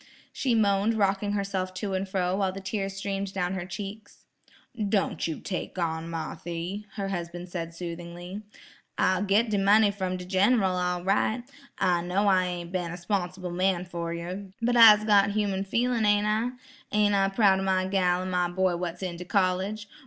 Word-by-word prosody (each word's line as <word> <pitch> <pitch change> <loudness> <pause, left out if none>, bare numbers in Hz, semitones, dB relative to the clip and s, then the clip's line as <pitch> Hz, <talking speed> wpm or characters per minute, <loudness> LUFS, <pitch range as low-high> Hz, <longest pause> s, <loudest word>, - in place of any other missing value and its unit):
she 250 -4 0
moaned 205 0 +2
rocking 205 0 +1
herself 195 -2 -2
to 195 0 -3
and 190 +1 -2
fro 185 -1 0
while 195 -1 0
the 195 - -7
tears 195 0 -3
streamed 195 0 -3
down 180 -1 -1
her 185 -2 -4
cheeks. 205 +3 -8 0.6
"Don' 200 -1 +1
you 160 -2 -2
take 185 -1 -5
on, 165 -1 -2
Marthy," 170 +4 -5
her 200 -2 -3
husband 175 -1 -5
said 165 -2 -5
soothingly. 175 +2 -7 0.6
'I'll 185 0 +2
git 205 +3 +2
de 205 - +2
money 205 +2 +5
from 185 -2 -3
de 180 - -8
Gin 200 +6 +3
ral 190 -2 +1
all 180 -1 -1
right. 215 +5 +1 0.3
I 175 -2 +2
know 185 +4 0
I 185 -2 +4
ain't 175 -1 -5
been 180 -2 -2
a 175 - -6
'sponsible 180 0 -3
man 180 0 +1
fer 170 -1 -4
yer, 180 +4 -5
but 240 +1 +1
I'se 215 -3 +9
got 200 -2 +5
human 200 -2 0
feelin', 235 +3 0
ain't 205 0 +3
I? 215 +3 +1 0.4
Ain't 210 -1 +3
I 195 -1 +3
proud 195 -2 +4
o' - - -2
my 190 -1 +1
gal 185 -2 +1
an' 185 - -4
my 180 -1 +1
boy 185 0 +1
what's 175 +1 -4
in 175 -2 -4
de 180 - -7
college? 195 +3 0
190 Hz, 190 wpm, -27 LUFS, 180-205 Hz, 0.6 s, I'se